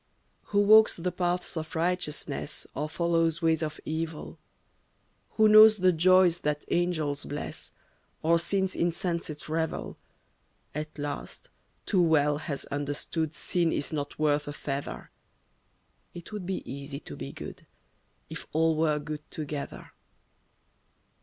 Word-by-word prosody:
Who 205 0 +2
walks 215 +2 +7
the 180 +1 -2
paths 180 +1 -1
of 160 -1 -5
righteousness 170 -2 -2
Or 150 +3 -3
follows 165 0 +1
ways 160 -1 +3
of 155 -1 -3
evil, 160 0 -4 0.9
Who 220 -1 +5
knows 215 0 +9
the 185 -1 +4
joys 180 +1 +5
that 150 -2 -2
angels 160 -5 0
bless 145 - -6 0.5
Or 165 +1 +4
sin's 190 +2 +1
insensate 170 -3 -2
revel, 160 +1 -2 0.8
At 155 +1 -5
last, 145 0 -6 0.4
too 190 -4 +2
well 150 -3 +3
has 145 -3 -4
understood 145 +2 -2
Sin 170 -2 0
is 145 - -2
not 145 -1 -4
worth 150 -1 +1
a 145 - -4
feather. 140 -1 -5 1.0
It 175 +3 -9
would 205 -4 -5
be 190 - -2
easy 140 +1 -6
to - - -9
be - - -6
good, - - -9 0.6
If - - -8
all 160 +1 +3
were 155 -1 +2
good 150 0 -5
together. 150 -2 -6
160 Hz, 130 wpm, -28 LUFS, 150-175 Hz, 1.0 s, knows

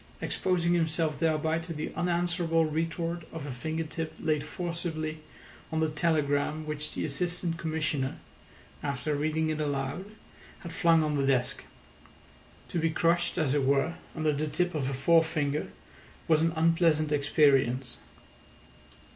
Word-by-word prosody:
exposing 175 -2 +1
himself 160 -3 0
thereby 160 0 +1
to 165 0 -6
the 150 0 -4
unanswerable 170 -1 +1
retort 165 +2 -2
of 160 -3 -6
a 145 - -4
finger 160 +6 -3
tip 160 0 -4
laid 150 -2 0
forcibly 160 -2 -4 0.5
on 160 - 0
the 160 - +3
telegram 150 -1 +1
which 150 0 -4
the - - -1
Assistant 170 +3 -2
Commissioner, 155 -4 -1 0.6
after 145 +1 -2
reading 155 +2 0
it 155 0 -2
aloud, 140 +4 -2 0.6
had 170 -1 -7
flung 165 -1 +4
on 150 -1 0
the 135 -1 +1
desk. 130 -2 +1 1.0
To 170 - -1
be 165 0 +2
crushed, 170 +2 +1
as 150 -6 +2
it 145 -2 +2
were, 140 +5 +2 0.2
under 155 -1 +1
the 150 +1 -1
tip 175 +4 0
of 140 -4 -1
a - - -3
forefinger 155 0 +2 0.6
was 155 -1 +4
an 165 0 +2
unpleasant 165 -2 +3
experience. 135 -4 +3
155 Hz, 140 wpm, -29 LUFS, 145-165 Hz, 1.0 s, flung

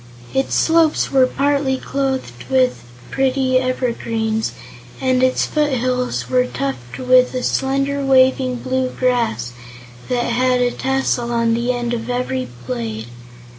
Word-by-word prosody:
Its 270 0 0
slopes 325 -1 +3
were 265 -2 +5
partly 280 0 0
clothed 265 - -3
with 260 -1 +2 0.3
pretty 265 -1 +2
evergreens, 230 -3 -1 0.5
and 255 -1 +1
its 255 0 +2
foot 300 -2 0
hills 250 - -1
were 125 0 +2
tufted 125 - -5
with 255 0 +5
a 250 - -2
slender 275 +1 0
waving 260 -1 +3
bluegrass 250 - -1 0.6
that 245 -1 0
had 250 +1 +1
a 245 0 +2
tassel 265 -3 -1
on 230 -1 +1
the 235 +2 0
end 240 -1 -2
of 230 0 -4
every 250 +1 -2 0.2
blade. 115 -2 -4
255 Hz, 130 wpm, -19 LUFS, 230-265 Hz, 0.6 s, were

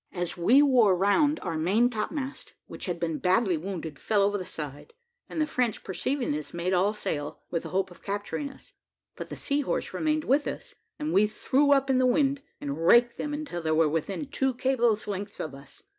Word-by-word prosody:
As 175 -2 -3
we 240 +12 +5
wore 240 -9 +5
round, 285 - +3
our 165 -3 -3
main 200 +9 +3
topmast, 260 +4 -4
which - - -8
had 175 -2 -2
been 165 -2 -2
badly 185 0 +2
wounded, 160 -3 -5
fell 205 -2 +2
over 205 +1 +2
the 185 -3 -4
side, 150 - -7 0.3
and - - -4
the 310 - +3
French 245 -7 -1
perceiving 255 - -2
this, 150 +2 -4
made 175 +2 -1
all 190 +3 +3
sail, 150 -8 -4
with 170 - 0
the - - -8
hope 190 0 -1
of 175 - -15
capturing 205 +8 -3
us; 270 - -16 0.4
but - - -7
the - - -6
Sea 285 +1 0
horse 275 - -2
remained 310 -1 0
with 285 +2 +2
us, - - -6 0.2
and 305 +1 -3
we 210 +2 +5
threw 280 +6 +1
up 275 -1 +4
in 265 -1 +3
the 255 - +4
wind, 275 +1 +2 0.2
and 145 +3 -4
raked 240 +3 +5
them 295 - -2
until 295 - -4
they 160 - -2
were 160 0 +4
within 165 - -2
two 265 -2 -1
cables' 240 -4 +1
length 200 0 -5
of 155 - -4
us. 140 0 -13
205 Hz, 210 wpm, -27 LUFS, 175-270 Hz, 0.4 s, we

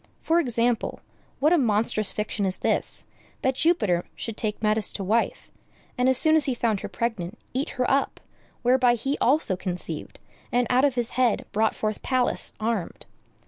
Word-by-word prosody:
For 330 +1 +3
example, 240 -5 0 0.4
what 305 +5 +3
a 345 - +4
monstrous 215 -3 +1
fiction 210 -1 -3
is 190 -1 +1
this, - - 0 0.4
that 260 - +2
Jupiter 255 - +2
should 225 - -5
take 215 0 -3
Metis 215 -1 +2
to 200 - -4
wife, 220 +5 -1 0.4
and 250 +1 +2
as 260 - +5
soon 315 +3 +5
as 315 - +5
he 260 - 0
found 225 -4 0
her - - -6
pregnant 225 -4 -3 0.2
eat 265 +3 -2
her 250 - +1
up, 275 +1 0 0.4
whereby 250 0 +4
he 270 +5 -2
also 265 -7 +2
conceived, 180 -4 -4 0.3
and 245 0 +2
out 255 +3 +4
of 275 -3 +1
his 240 -2 -1
head 250 -3 +1
brought 220 +1 +1
forth 215 -1 -3
Pallas 255 -2 +2
armed. 220 -5 -3
235 Hz, 175 wpm, -25 LUFS, 210-260 Hz, 0.4 s, as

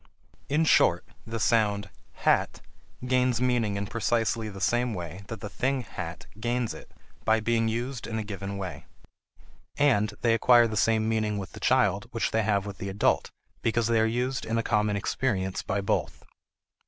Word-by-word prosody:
In 155 +3 +2
short, 90 - +4 0.2
the 115 0 -4
sound 105 -1 +1 0.3
h - - -12
a - - +4
t - - -17 0.4
gains 125 -2 +2
meaning 120 -5 +1
in 100 0 -2
precisely 115 +1 0
the 100 -1 -9
same 120 +3 +1
way 90 +2 -6
that 115 -3 -7
the - - -4
thing 130 +3 -1
"hat" - - -7
gains 120 +1 -1
it, - - -12 0.3
by 110 0 +3
being 115 0 +1
used 120 +2 -3
in 110 - -3
a 110 - -2
given 100 -1 -5
way. 95 -2 -6 0.9
And 105 -8 +2
they 115 -2 +3
acquire 120 +1 +6
the 110 - -4
same 110 0 +2
meaning 110 -2 0
with 95 -2 -6
the - - -10
child - - +2
which - - -1
they 110 - +2
have 100 -2 +1
with 100 -2 -7
the 100 - -4
adult 95 +1 +1 0.3
because 115 0 +1
they 115 0 +2
are 110 - +4
used 125 +3 -1
in 115 - -1
a 115 - +1
common 105 -2 +1
experience 100 -2 -1
by 100 +1 -2
both. 100 - -2
110 Hz, 185 wpm, -27 LUFS, 100-120 Hz, 0.9 s, acquire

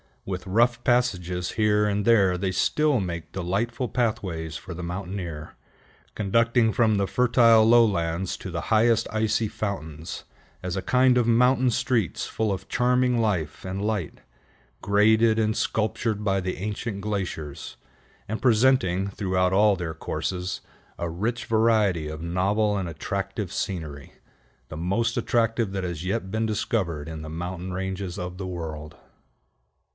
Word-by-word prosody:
With 95 -1 -5
rough 120 +4 +2
passages 90 -8 0
here 105 -1 +2
and 105 0 0
there 100 -6 +4
they 95 +1 -1
still 145 +8 +2
make 85 -4 -5
delightful 105 +8 -2
pathways 90 -10 -2
for 85 +4 -7
the 90 +1 -7
mountaineer, 90 -3 -5 0.6
conducting 115 +3 +2
from 110 -3 +3
the 100 -1 +1
fertile 115 -2 +5
lowlands 95 -7 +3
to 95 - -7
the 85 -2 -3
highest 115 +1 +3
icy 110 0 +1
fountains, 85 -6 -5 0.4
as 90 -1 -3
a 95 - -1
kind 125 +2 +3
of 120 -2 +2
mountain 125 +2 +4
streets 120 -3 0
full 110 -2 -1
of 95 -1 -4
charming 125 0 +2
life 90 -10 -1
and 95 +2 -3
light, 105 -6 -2 0.6
graded 110 +2 +4
and 110 -1 +1
sculptured 110 0 -1
by 95 -2 +1
the 95 0 -3
ancient 105 +1 -4
glaciers, 95 -8 -4 0.5
and 110 +2 -4
presenting, 110 -6 +3
throughout 95 -2 0
all 105 +1 +5
their 85 -3 -4
courses, 90 +3 -3 0.4
a 85 - -3
rich 115 +9 -2
variety 110 -7 +2
of 80 +1 -6
novel 100 +5 +1
and 95 -3 -2
attractive 95 +4 -4
scenery, 75 -7 -5 0.6
the 75 - -7
most 105 +8 0
attractive 115 -3 +1
that 95 -1 -3
has 85 -1 -4
yet 95 0 -2
been 110 +1 0
discovered 100 - -1
in 80 -1 -6
the 80 - -7
mountain 90 +3 -5
ranges 95 0 -4
of 90 0 -5
the 95 -1 -5
world. 80 -4 -6
100 Hz, 145 wpm, -25 LUFS, 90-115 Hz, 0.6 s, fertile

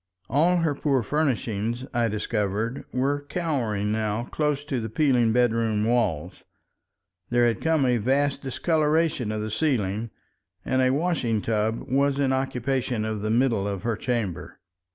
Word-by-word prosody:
All 170 +6 +3
her 165 -3 +1
poor 135 -3 0
furnishings, 120 -4 -1
I 120 -1 +2
discovered, 105 +2 -2
were 145 +3 -1
cowering 120 - -1
now 110 +1 -1
close 150 +2 -1
to 135 -4 -2
the 110 - -4
peeling 125 -2 +2
bedroom 115 -3 +2
walls; 110 -10 0 0.9
there 120 0 +3
had 115 -3 0
come 160 -4 +2
a 125 -1 +3
vast 135 +5 +1
discoloration 155 -2 +1
of 110 0 -2
the 110 - -4
ceiling, 110 -5 0 0.6
and 130 0 +1
a 130 - +4
washing 140 -6 0
tub 110 +1 -1
was 140 +2 +2
in 135 -2 +2
occupation 130 -3 -1
of 110 -2 -3
the 110 - -2
middle 115 -3 +2
of 100 -2 -4
her 115 -1 0
chamber. 110 - -3
120 Hz, 150 wpm, -25 LUFS, 110-140 Hz, 0.9 s, a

